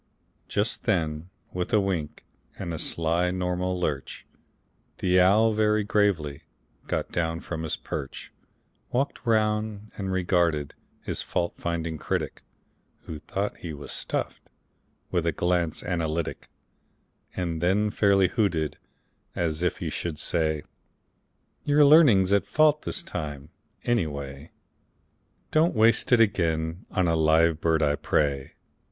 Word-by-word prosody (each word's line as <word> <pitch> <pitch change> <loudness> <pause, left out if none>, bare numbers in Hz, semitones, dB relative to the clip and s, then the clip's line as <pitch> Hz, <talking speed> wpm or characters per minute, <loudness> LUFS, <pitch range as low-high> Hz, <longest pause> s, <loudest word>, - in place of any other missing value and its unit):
Just - - -1
then, 80 +1 0 0.2
with 90 +3 -3
a 110 - +5
wink 90 -7 -3 0.3
and 85 - -4
a 80 - -4
sly 85 +2 0
normal 90 0 -1
lurch, 75 -6 -3 0.7
The 90 0 +3
owl, 105 +5 +5
very 105 0 +2
gravely, 100 -9 +1 0.5
got - - -2
down 80 -1 -1
from 80 -2 -5
his 80 - -2
perch, - - -6 0.6
Walked 135 +3 -1
round, 110 -1 0
and 95 -2 -3
regarded 85 -5 +1 0.3
his - - -2
fault 85 0 -2
finding 85 -2 -3
critic - - -3 0.6
(Who 80 - -7
thought 100 +6 -3
he 85 -3 -6
was 75 -1 -8
stuffed) - - -4 0.6
with 90 -2 +1
a - - +3
glance 85 0 0
analytic, 85 -2 -2 0.9
And 85 -3 -2
then 100 +4 +2
fairly 100 -3 +4
hooted, 85 - 0 0.6
as 80 -2 -1
if 90 -1 0
he - - -4
should 85 -3 -4
say: 80 -2 0 1.0
"Your 145 0 +5
learning's 125 - +6
at 100 - +2
fault 155 0 +4
this - - -3
time, 75 -1 -6 0.3
any 120 -9 +1
way; 70 +1 -7 1.0
Don't 160 0 +3
waste 110 +2 +4
it 120 - +6
again 85 -5 +1
on 95 -1 +1
a 80 - +2
live 80 0 +3
bird, 80 -1 +2
I 75 -1 +2
pray. 70 -3 0
90 Hz, 130 wpm, -26 LUFS, 80-100 Hz, 1.0 s, learning's